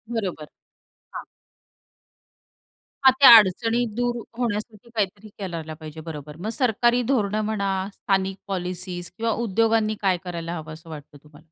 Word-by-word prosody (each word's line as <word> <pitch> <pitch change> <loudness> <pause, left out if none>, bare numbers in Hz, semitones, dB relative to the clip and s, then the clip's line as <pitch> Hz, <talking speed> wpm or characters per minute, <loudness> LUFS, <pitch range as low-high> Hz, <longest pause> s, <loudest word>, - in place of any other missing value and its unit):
बरोबर. 180 -8 -3 0.7
हां. - - -6 1.8
हां, 265 - +10
त्या 280 - +10
अडचणी 225 +4 +2
दूर 245 0 0 0.2
होण्यासाठी 220 -1 -3
काहीतरी 205 +1 -2
करायला 165 -5 -5
पाहिजे, 155 0 -9
बरोबर. 150 -2 -8
मग 205 +6 -4
सरकारी 240 -1 +2
धोरणं 215 -4 +1
म्हणा, 205 -2 -1 0.2
स्थानिक 195 0 -1
पॉलिसीज 180 -2 -5
किंवा 230 0 0
उद्योगांनी 220 +1 +2
काय 190 -3 +2
करायला 170 -1 -5
हवं, 155 0 -8
असं 165 +1 -13
वाटतं 150 -1 -10
तुम्हाला? 150 +1 -18
195 Hz, 130 wpm, -24 LUFS, 165-225 Hz, 1.8 s, हां